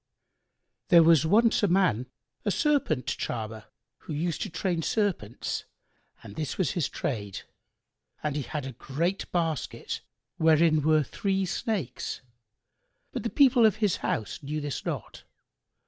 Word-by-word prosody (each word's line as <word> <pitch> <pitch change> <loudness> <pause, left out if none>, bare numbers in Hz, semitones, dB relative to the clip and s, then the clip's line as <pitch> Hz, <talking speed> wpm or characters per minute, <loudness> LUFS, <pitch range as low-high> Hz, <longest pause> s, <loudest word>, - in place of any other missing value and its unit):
There 170 -2 +7
was 160 -2 +5
once 225 +6 +4
a 205 - +4
man, 175 - +2 0.4
a 210 - 0
Serpent 280 - +1
charmer,[FN#91] 110 -3 -4 0.3
who - - -7
used 165 +2 -2
to - - -2
train 175 0 -1
serpents, 175 - -1 0.6
and 100 - -10
this 155 -4 -3
was 180 -9 +1
his 170 -6 -1
trade; 100 -7 -4 0.8
and 150 -2 -1
he 150 - 0
had 145 +1 -4
a 135 - -5
great 165 - -2
basket,[FN#92] 165 -6 -2 0.4
wherein 160 -1 +4
were 155 +1 +4
three 195 - -1
snakes 185 - -3 0.9
but - - -3
the - - -2
people 260 -4 +5
of 215 -2 +5
his 210 -4 +1
house 110 - -3
knew 150 +2 -3
this 145 -2 -4
not. - - -5
160 Hz, 140 wpm, -28 LUFS, 140-195 Hz, 0.9 s, There